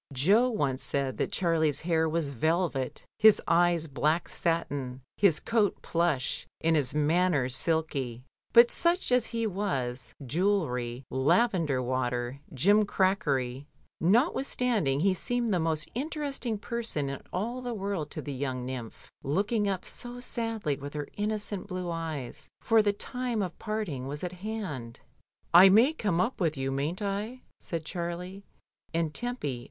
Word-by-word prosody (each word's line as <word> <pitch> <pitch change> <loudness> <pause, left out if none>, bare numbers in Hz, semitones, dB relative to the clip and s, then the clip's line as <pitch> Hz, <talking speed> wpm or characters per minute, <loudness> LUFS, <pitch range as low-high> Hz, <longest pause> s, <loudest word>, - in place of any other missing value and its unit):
Jo 200 - +4
once 140 - -1
said 135 -2 -1
that - - -1
Charlie's 160 -5 +1
hair 160 -1 +1
was 160 -2 -1
velvet, 155 -1 0
his 220 -1 +7
eyes 170 -1 +3
black 155 +4 0
satin, 145 -7 -2 0.2
his 185 -7 +4
coat 220 -4 +1
plush, 165 -6 0
and 165 0 +3
his 145 -2 +1
manners 150 -4 +2
silky; 140 -8 -1 0.3
but 235 0 +7
such 345 -3 0
as 250 -2 +3
he 230 -1 -2
was, 155 - -2
jewellery, 135 -7 0
lavender 150 - +2
water, 125 0 -2
jimcrackery, 150 - +2 0.3
notwith 240 - +3
standing, 210 - +1
he 190 +1 +4
seemed 240 +3 -1
the 180 - +2
most 160 -1 -1
interesting 275 -4 -2
person 225 -10 -2
in 140 0 -5
all 235 +7 -2
the 245 -1 -4
world 195 -7 -3
to - - -6
the 145 - -5
young 130 -2 -3
nymph 125 -3 -7
looking 205 - 0
up 190 -2 -2
so 245 0 -6
sadly 225 - -2
with 145 +1 -8
her 145 -1 -4
innocent 210 -1 -2
blue 180 -2 -4
eyes, 160 -6 -5
for 225 -1 +4
the 205 -1 +2
time 240 +1 -2
of 180 -2 -6
parting 210 - -3
was 145 +4 -5
at 180 0 -3
hand. 180 - -5 0.5
"I 180 +3 +10
may 230 +10 +6
come 205 - 0
up 215 +4 0
with 160 -4 +1
you, 135 0 -1
mayn't 150 +9 -2
I?" 210 +6 -3 0.2
said 165 -2 -5
Charlie, 180 +3 -5 0.5
and 165 -2 0
Tempy 245 - -3
170 Hz, 145 wpm, -29 LUFS, 140-210 Hz, 0.5 s, I